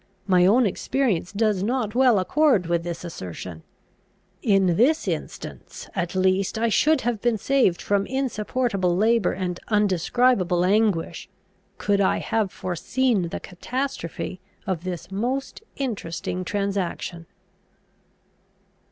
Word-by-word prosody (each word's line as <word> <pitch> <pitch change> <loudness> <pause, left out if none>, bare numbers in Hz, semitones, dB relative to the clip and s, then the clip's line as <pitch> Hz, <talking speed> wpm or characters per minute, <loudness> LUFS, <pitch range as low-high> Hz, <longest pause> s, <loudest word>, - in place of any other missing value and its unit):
My 180 -2 +4
own 240 +5 +5
experience 205 -3 0
does 210 -2 +1
not 225 0 -1
well 250 -3 +5
accord 250 - +3
with 170 0 0
this 170 0 -5
assertion. 90 - -7 0.8
In 195 -5 +3
this 275 - +3
instance - - -6
at 175 -1 -2
least 190 +2 +1
I 230 +1 +1
should 300 +6 +3
have 235 -4 -1
been 240 -2 +2
saved 230 -6 +2
from 200 -1 +1
insupportable 225 -7 0
labour 225 0 +3
and 180 -2 -3
undescribable 200 -2 +2
anguish, 200 -3 +1 0.5
could 200 -1 +1
I 190 - +3
have 215 -4 -1
foreseen 200 +3 0
the - - -4
catastrophe 185 - -4 0.2
of 185 -2 -3
this 175 -1 -5
most 255 - -2
interesting 185 -8 -3
transaction. 190 -4 -3
200 Hz, 115 wpm, -24 LUFS, 180-240 Hz, 0.8 s, own